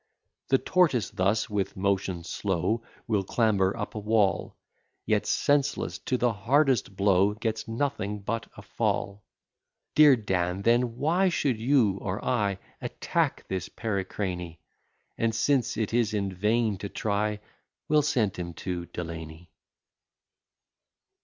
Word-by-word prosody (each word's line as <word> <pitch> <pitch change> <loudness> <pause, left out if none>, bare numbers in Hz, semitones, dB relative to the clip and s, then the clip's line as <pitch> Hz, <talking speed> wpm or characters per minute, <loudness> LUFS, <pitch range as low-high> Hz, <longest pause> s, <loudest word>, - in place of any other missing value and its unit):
The 135 - +4
tortoise 135 - +2
thus, 100 +4 +1
with 100 -2 -2
motion 95 -2 0
slow, 95 +5 -1 0.2
Will 105 -4 +1
clamber 100 -2 +1
up - - -4
a 110 - -4
wall; 105 -3 +1 0.5
Yet, 105 -1 +1
senseless 145 -1 +1
to 125 - -1
the 120 -1 +2
hardest 125 0 +2
blow, 100 +1 +3
Gets 110 0 -3
nothing 115 -4 -2
but 115 +3 -3
a - - -10
fall. 100 +1 -2 0.7
Dear 150 -3 +7
Dan, 95 -4 -1
then, 120 +1 +2
why 175 +7 +2
should 135 -9 0
you, 115 -6 +3
or 95 +2 -4
I, 100 -6 +1 0.2
Attack - - -1
his 95 -2 -3
pericrany? 95 -5 -3 0.6
And, 115 -1 +1
since 130 -2 +1
it 110 -1 -1
is 115 -3 +2
in 100 -2 -1
vain 105 +2 +1
to 100 - -5
try, 105 +1 -1 0.5
We'll 150 0 +4
send 120 -9 0
him 85 -2 -5
to 90 -1 -4
Delany. 80 -1 -7
105 Hz, 130 wpm, -27 LUFS, 95-120 Hz, 0.7 s, Dear